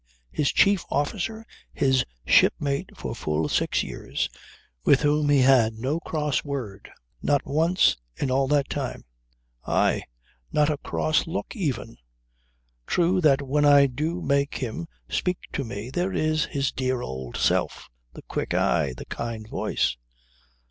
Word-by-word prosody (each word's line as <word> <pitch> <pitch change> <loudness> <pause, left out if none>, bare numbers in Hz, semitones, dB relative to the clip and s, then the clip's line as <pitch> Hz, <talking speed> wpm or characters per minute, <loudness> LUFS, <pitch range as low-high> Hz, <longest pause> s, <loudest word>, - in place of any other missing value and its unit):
His 145 - +1
chief 200 -2 +4
officer; 215 +10 -2 0.3
his 130 -1 +2 0.2
shipmate 140 -1 +3
for - - -4
full 75 0 -1
six - - +1
years, - - -3 0.5
with 140 - +5
whom 145 0 +2
he 145 -2 +5
had 125 -4 +5
no 130 +8 -1
cross 150 -5 -1
word 130 -9 -5 0.3
not 145 -1 +1
once 165 - +3 0.2
in 130 - -2
all 135 +1 +2
that 145 0 +2
time. 140 -3 -4 0.6
Aye. - - +2 0.5
Not 150 0 +3
a 145 - -3
cross 155 - 0
look 165 - -4
even. 140 - -3 0.9
True 180 +2 +2
that 145 -3 +4
when 145 +2 +1
I 145 -1 +7
do 155 +7 -2
make 140 0 +1
him 110 -10 -4 0.2
speak 180 -1 -1 0.2
to 140 - -1
me, 115 0 -6
there 175 +6 -1
is 155 -3 +1
his 140 -1 -1
dear 130 -1 -1
old 65 -2 -6
self, - - 0 0.3
the - - -11
quick - - -3
eye, 75 -7 +1
the - - -8
kind 115 -2 -5
voice. 60 - -1
140 Hz, 145 wpm, -25 LUFS, 125-155 Hz, 0.9 s, I